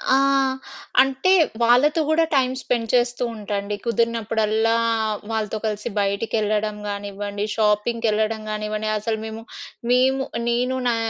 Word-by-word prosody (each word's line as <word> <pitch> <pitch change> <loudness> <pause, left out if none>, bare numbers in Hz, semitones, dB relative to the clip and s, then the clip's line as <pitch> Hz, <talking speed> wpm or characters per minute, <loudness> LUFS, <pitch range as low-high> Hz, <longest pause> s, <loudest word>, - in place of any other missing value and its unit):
ఆ! - - +5 0.8
అంటే 270 +7 +1 0.3
వాళ్ళతో 285 +7 +4
గూడా 325 +1 +4
టైమ్ 260 -1 +2
స్పెండ్ 230 -2 -1
చేస్తూ 245 0 +2
ఉంటా 210 -1 -6
అండి. 205 +1 -4
కుదిరినప్పుడల్లా 225 -1 +1 0.6
వాళ్ళతో 215 -1 -2
కలిసి 210 +2 -2
బయటికెళ్ళడం 210 +1 0
గానివ్వండి 205 0 -4
షాపింగ్‌‌కెళ్ళడం 220 0 +1
గానివ్వండి. 215 0 -3
అసలు 220 +1 -2
మేము 220 +1 -7 0.5
మేము 265 +2 +3 0.3
నేను 250 +2 0
నా 235 - +1
220 Hz, 115 wpm, -22 LUFS, 210-240 Hz, 0.8 s, ఆ